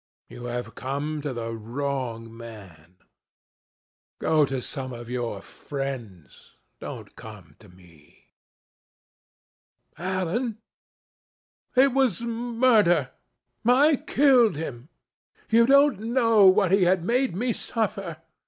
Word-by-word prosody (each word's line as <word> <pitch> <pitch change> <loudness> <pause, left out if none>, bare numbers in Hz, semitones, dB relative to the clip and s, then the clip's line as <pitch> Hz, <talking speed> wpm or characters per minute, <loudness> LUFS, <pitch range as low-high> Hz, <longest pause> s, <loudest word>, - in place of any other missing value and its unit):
You 120 0 -9
have 120 0 -5
come 145 +3 -4
to 145 -1 -3
the 115 -2 -5
wrong 115 -1 -4
man. 95 -8 -12 1.2
Go 155 -2 +2
to 135 -1 -3
some 130 0 -6
of 120 0 -9
your 120 -5 -3
friends. 120 - -8 0.2
Don't - - -9
come 95 -9 -12
to 105 - -17
me." 85 -5 -21 1.7
"Alan, 190 +6 -2 1.2
it 260 0 +5
was 255 -6 +1
murder. 230 - +2 0.5
I 275 +5 +4
killed 250 - +3
him. 140 -3 -7 0.6
You 230 +1 +5
don't 280 -4 +5
know 230 -3 +4
what 190 -1 +4
he 195 0 +4
had 180 -1 +2
made 250 -1 +1
me 240 +4 -1
suffer. 195 -9 -3
155 Hz, 105 wpm, -25 LUFS, -, 1.7 s, it